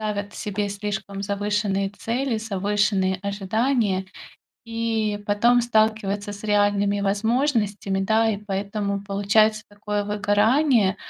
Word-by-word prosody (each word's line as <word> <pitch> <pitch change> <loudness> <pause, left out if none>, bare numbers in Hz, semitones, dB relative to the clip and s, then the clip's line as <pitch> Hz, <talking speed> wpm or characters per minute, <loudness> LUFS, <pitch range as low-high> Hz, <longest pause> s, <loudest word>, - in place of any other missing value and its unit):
ставят 205 -1 -3
себе 205 0 -3
слишком 200 -1 -4
завышенные 200 -1 -1
цели, 230 +3 -2
завышенные 200 -2 0
ожидания, 200 0 0 0.6
и 225 -2 -1
потом 235 +4 +4
сталкиваются 215 -3 0
с 205 +1 -10
реальными 205 -1 +2
возможностями, 210 -1 0
да. 220 +3 +2
И 205 - -1
поэтому 200 0 -3
получается 210 +2 +2
такое 205 0 -3
выгорание. 210 +2 +2
205 Hz, 105 wpm, -23 LUFS, 200-220 Hz, 0.6 s, потом